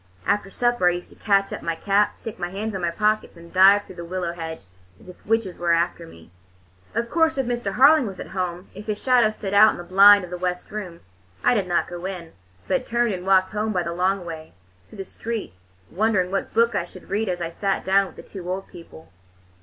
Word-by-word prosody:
After 205 -1 0
supper 240 -4 +2
I - - 0
used 175 0 -7
to - - -16
catch 200 -2 +1
up - - -6
my 165 -1 -2
cap, 200 +4 +1
stick 225 -4 -8
my 175 -1 -3
hands 205 +4 -4
in 190 - -4
my 175 - 0
pockets, 210 +1 0
and 170 0 -14
dive 195 +2 +6
through 185 - -13
the 170 - -6
willow 175 0 -3
hedge 160 - -7 0.3
as - - -16
if 180 - -15
witches 220 -5 0
were 170 -1 +2
after 170 0 -1
me. 85 - -16 0.6
Of 230 +1 0
course, 320 +2 +1
if 270 - 0
Mr. 240 -5 -2
Harling 280 0 +6
was 195 -2 -8
at - - -7
home, 180 -1 -4
if 210 - -10
his 210 -1 -2
shadow 250 -4 +4
stood 205 -2 -6
out 210 +2 +8
on - - -3
the 175 - -7
blind 200 +2 +7
of 180 - -9
the 180 - -5
west 180 0 -3
room, 190 -5 -7 0.4
I - - +4
did 200 -6 0
not 175 -1 +1
go 175 0 -7
in, 180 -4 -6 0.4
but - - 0
turned 235 -2 +1
and 180 0 -6
walked 190 -1 +4
home 215 0 -2
by 180 -2 0
the 170 0 -4
long 185 +1 0
way, 160 -2 -8 0.4
through - - -14
the 195 - -6
street, 225 - -5 0.4
wondering 190 -2 +1
what 195 - -2
book 235 +1 +2
I 170 - -1
should 185 +1 -15
read 210 +1 0
as 180 -1 -2
I 170 -1 -3
sat 195 +3 -2
down 195 +1 +3
with - - -15
the - - -11
two 180 -3 -9
old 190 +1 -4
people. 165 - -14
190 Hz, 240 wpm, -23 LUFS, 175-215 Hz, 0.6 s, out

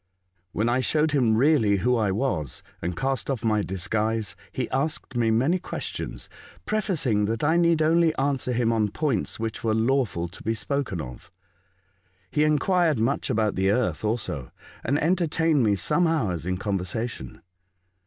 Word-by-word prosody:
When 110 +5 0
I 120 +2 +2
showed 150 +4 +1
him 120 -6 +3
really 120 -7 +4
who 125 +6 +2
I 110 -4 +1
was, 95 - -2 0.2
and 85 0 -3
cast 135 +4 -1
off 125 -5 -2
my 110 -2 +2
disguise, 105 +3 -1 0.2
he 125 -3 -2
asked 140 0 -2
me 115 -2 +2
many 135 +11 +2
questions, - - -5 0.4
pre 215 0 0
facing 130 - +1
that 110 +4 -2
I 160 +3 +3
need 170 -2 +3
only 165 0 +3
answer 135 -2 0
him 115 -1 +1
on 110 -2 +1
points 145 +2 -1
which 110 0 -4
were 110 -1 +1
lawful 110 -7 +1
to 90 - -13
be 115 +1 -1
spoken 120 - -2
of. 60 -3 -10 1.0
He 150 - +2
enquired 155 +1 +2
much 115 +6 0
about 110 -1 +1
the 95 +1 +1
earth 110 +2 0
also, 105 - -2 0.3
and 140 - +1
enter 170 +3 +1
tained 160 -2 +2
me 105 -3 +3
some 170 - +2
hours 95 - -1
in 90 0 -1
conversation. 95 - -4
120 Hz, 165 wpm, -25 LUFS, 105-150 Hz, 1.0 s, really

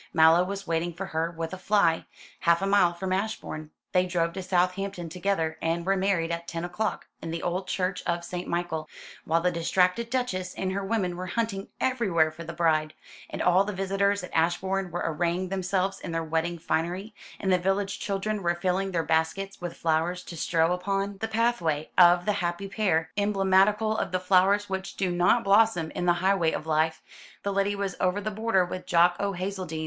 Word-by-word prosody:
Mallow 160 +2 +6
was 195 +1 -5
waiting 170 0 -1
for 185 +4 -5
her 165 -2 -1
with 165 0 -5
a 185 - -6
fly, 185 -5 +2 0.3
half 170 +2 +3
a - - +2
mile 195 -3 +4
from 185 +2 -3
Ashbourne. 190 -6 -3 0.2
They 185 0 +2
drove 170 -2 0
to 190 - -4
Southampton 180 0 -1
together, 170 -2 -1
and 165 +1 -1
were 195 +1 +2
married 185 -4 +1
at 170 0 -4
ten 165 0 -4
o'clock, 210 +5 -3 0.2
in 165 - -5
the 165 +1 -4
old 185 +2 -2
church 185 0 -1
of 170 0 -1
St. 180 +1 -5
Michael. 170 -3 -2 0.4
While 165 +1 +2
the 180 +1 +2
distracted 180 +6 +1
Duchess 215 -8 -2
and 190 -1 -2
her 200 +1 -2
women 195 -4 -1
were 185 +1 -5
hunting 205 -1 -2
everywhere 195 -12 +2
for 160 +2 -9
the 165 - -6
bride, 155 -2 +1 0.3
and - - -3
all 180 +2 +5
the 205 +1 -4
visitors 195 +1 0
at 180 - -9
Ashbourne 185 +3 0
were 175 +1 -3
arraying 170 +3 -1
themselves 190 0 -1
in - - -6
their 165 0 -1
wedding 165 +2 -1
finery, 175 +6 -2 0.3
and 190 -2 +1
the 180 - +3
village 195 +2 -1
children 205 +1 -2
were 175 -1 +1
filling 185 +2 0
their 170 -3 0
baskets 160 +6 -1
with 175 -1 -5
flowers 165 +2 0
to 170 - -9
strew 165 +1 +1
upon 195 +2 -2
the 225 - -2
pathway 215 -10 0
of 175 0 +6
the 210 - +2
happy 175 +3 -2
pair, 170 -6 0
emblematical 205 +2 +3
of 200 - -2
the 185 - 0
flowers 195 +2 +3
which 190 0 -4
do 185 -2 0
not 175 +7 +3
blossom 200 -5 +3
in 180 - -3
the 175 - +6
highway 190 -4 +3
of 155 - -4
life, 160 0 0 0.4
the 200 - -1
lady 200 +1 +1
was 200 -2 -3
over 185 +2 +1
the 215 +1 -3
border 210 -3 +1
with 180 +1 -7
Jock 175 0 +4
o' 200 0 -1
Hazeldean! 185 -3 -4
180 Hz, 200 wpm, -27 LUFS, 170-195 Hz, 0.4 s, Mallow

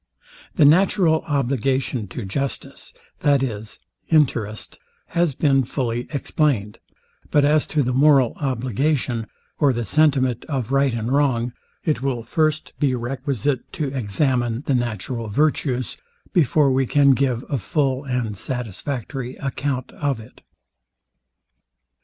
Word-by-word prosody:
The 155 - +5
natural 165 0 +4
obligation 130 -4 0
to 105 +4 -6
justice, 135 +7 -4 0.3
viz, 130 -8 0 0.3
interest, 120 -9 +1 0.3
has 170 -5 +1
been 135 -2 +3
fully 120 -1 -2
explained; 140 - -1 0.5
but 145 -1 +4
as 150 +1 +3
to 150 -2 +1
the 125 0 -1
moral 135 -2 +5
obligation, 130 -2 -1 0.3
or 145 -3 +4
the 120 -2 -2
sentiment 135 -4 +2
of 130 -5 -3
right 135 -3 +2
and 115 +1 -2
wrong, 125 -4 +1 0.3
it 150 -6 0
will 130 -4 -1
first 155 +5 0
be 135 -4 +2
requisite 130 +1 -2
to 150 -4 -2
examine 120 +1 0
the 140 - +1
natural 120 -1 -2
virtues, 130 +1 0 0.4
before 150 -3 +3
we 130 0 +1
can 140 +1 +5
give 130 -2 +1
a 140 - -1
full 135 +4 0
and 125 -5 -2
satisfactory 125 +3 -4
account 135 -1 -3
of 140 -5 -2
it. 110 +2 -14
130 Hz, 125 wpm, -22 LUFS, 120-145 Hz, 0.5 s, The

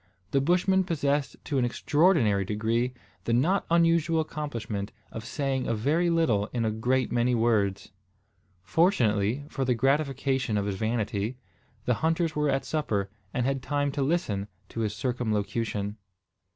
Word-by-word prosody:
The 135 - +3
Bushman 180 +5 +3
possessed 145 -5 0
to 140 -3 0
an - - +2
extraordinary 120 - +3
degree 115 +5 -1 0.3
the 115 - +1
not 165 +12 +2
unusual 165 -1 +3
accomplishment 120 -10 -4 0.2
of 110 - -6
saying 135 +1 -2
a 115 - +1
very 155 +10 +1
little 140 -12 +2
in 115 -1 -2
a 110 - +1
great 125 +4 0
many 120 +1 +2
words. 110 -4 +1 0.7
Fortunately, 120 - +2
for 135 -3 -3
the 125 -1 +2
gratification 135 -2 +1
of 100 - 0
his 100 - -1
vanity, 110 +1 -1 0.5
the 125 - +3
hunters 165 0 +1
were 150 -1 +1
at 135 0 0
supper, 105 -11 -1 0.2
and 125 - -1
had 135 0 0
time 145 +1 0
to 140 - -2
listen 135 - 0 0.2
to - - -6
his 105 -2 -1
circumlocution. 110 -3 -2
125 Hz, 150 wpm, -27 LUFS, 110-150 Hz, 0.7 s, The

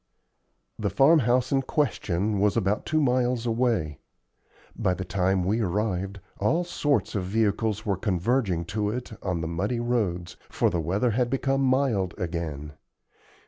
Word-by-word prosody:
The 105 -2 0
farmhouse 130 - +4
in 135 -1 +3
question 105 - 0
was 105 0 +2
about 100 +3 0
two 155 - +2
miles 125 -3 +1
away. 115 - 0 0.8
By 90 - 0
the 95 - -5
time 95 0 +1
we 105 +6 +1
arrived, 100 0 -1 0.2
all 160 - +2
sorts 145 -5 0
of 100 -4 -1
vehicles 105 +1 0
were 100 -3 0
converging 95 -2 0
to 105 -2 0
it 120 +3 -4
on 90 -3 -2
the 80 - -3
muddy 100 +9 -1
roads, 105 -8 -1
for - - +1
the 85 - 0
weather 100 +9 +1
had 120 +2 +1
become 135 +1 0
mild 130 -9 +1
again. 80 -5 -4
105 Hz, 145 wpm, -26 LUFS, 90-125 Hz, 0.8 s, farmhouse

